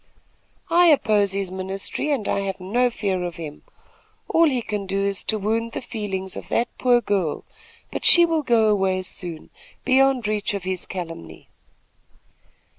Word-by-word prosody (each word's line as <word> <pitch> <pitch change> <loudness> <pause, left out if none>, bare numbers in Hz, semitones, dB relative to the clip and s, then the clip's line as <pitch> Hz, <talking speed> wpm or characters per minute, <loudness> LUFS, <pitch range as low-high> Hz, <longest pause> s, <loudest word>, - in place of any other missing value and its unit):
"I 350 +1 +6
oppose 210 - +3
his 195 -2 -3
ministry, 190 +9 -2
and 270 -8 -1
I - - 0
have 195 -1 -3
no 240 +7 +1
fear 195 -5 -2
of 175 -2 -4
him. 155 -3 -8 0.7
All 330 - +4
he 250 -4 -1
can 205 -3 -4
do 195 +1 -1
is 200 -1 0
to 220 - +1
wound 225 +3 -1
the - - -3
feelings 195 -5 -4
of - - -8
that 235 - -1
poor 245 -1 +4
girl; 190 -9 -1 0.5
but - - -5
she 345 0 +7
will 325 -2 0
go 235 -5 +3
away 190 -3 +1
soon, 175 -3 -5 0.3
beyond 260 -3 +3
reach 210 -1 -1
of 195 - -5
his 185 -1 -3
calumny." 165 - -8
200 Hz, 165 wpm, -23 LUFS, 185-240 Hz, 0.7 s, she